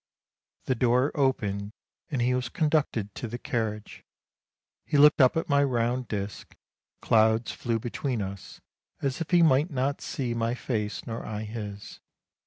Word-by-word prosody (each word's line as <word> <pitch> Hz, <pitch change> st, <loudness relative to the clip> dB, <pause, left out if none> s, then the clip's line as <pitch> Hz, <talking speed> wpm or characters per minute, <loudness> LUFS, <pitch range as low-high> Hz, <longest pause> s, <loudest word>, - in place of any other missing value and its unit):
The 130 Hz, -, +1 dB
door 125 Hz, +3 st, +2 dB
opened, 105 Hz, -8 st, 0 dB, 0.4 s
and 135 Hz, -6 st, 0 dB
he 125 Hz, +1 st, +2 dB
was 125 Hz, -1 st, -1 dB
conducted 150 Hz, -, 0 dB
to 120 Hz, -, -5 dB
the 120 Hz, +2 st, -5 dB
carriage, 110 Hz, -3 st, -4 dB, 0.8 s
he 150 Hz, -, 0 dB
looked 150 Hz, +1 st, +7 dB
up 130 Hz, +4 st, +5 dB
at 165 Hz, -, -1 dB
my 140 Hz, -1 st, +4 dB
round 125 Hz, -1 st, 0 dB
disc 100 Hz, -1 st, -5 dB, 0.2 s
— -, -, -56 dB
clouds 110 Hz, +1 st, +3 dB
flew 115 Hz, -1 st, -2 dB
between 120 Hz, +2 st, -3 dB
us, 100 Hz, -1 st, -7 dB, 0.4 s
as 135 Hz, +2 st, -1 dB
if 165 Hz, -, -3 dB
he 175 Hz, -2 st, +5 dB
might 150 Hz, +1 st, +4 dB
not 140 Hz, 0 st, -1 dB
see 125 Hz, -4 st, -3 dB
my 115 Hz, +1 st, -1 dB
face 110 Hz, -5 st, -3 dB
nor 115 Hz, 0 st, -5 dB
I 105 Hz, 0 st, -5 dB
his. 105 Hz, -2 st, -7 dB
120 Hz, 160 wpm, -27 LUFS, 110-135 Hz, 0.8 s, looked